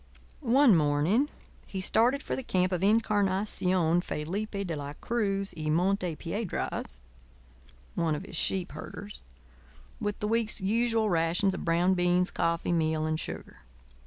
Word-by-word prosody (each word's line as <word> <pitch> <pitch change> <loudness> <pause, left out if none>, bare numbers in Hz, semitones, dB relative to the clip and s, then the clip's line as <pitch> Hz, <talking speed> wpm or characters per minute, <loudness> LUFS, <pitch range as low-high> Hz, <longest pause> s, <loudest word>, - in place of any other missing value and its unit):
One 260 -4 +5
morning 160 - +2 0.4
he 195 - -5
started 240 +8 +2
for - - -2
the - - -3
camp 185 -6 0
of 180 -2 -1
Incarnación 190 -5 +2
Felipe 200 +7 -3
de 170 -3 -3
la 145 -1 -5
Cruz 200 0 -1
y 155 -1 -3
Monte 180 +1 +1
Piedras 170 - -4 1.0
(one 165 -2 0
of - - -5
his - - -8
sheep 185 +2 0
herders) 205 0 -8 0.8
with 205 -1 -3
the 210 - -1
week's 225 -1 0
usual 225 +1 +1
rations 170 +3 +2
of - - -5
brown 170 +3 +3
beans, 180 0 +2
coffee, 170 +1 0
meal, 160 -2 +1
and 155 0 -1
sugar. - - -7
185 Hz, 140 wpm, -29 LUFS, 165-210 Hz, 1.0 s, One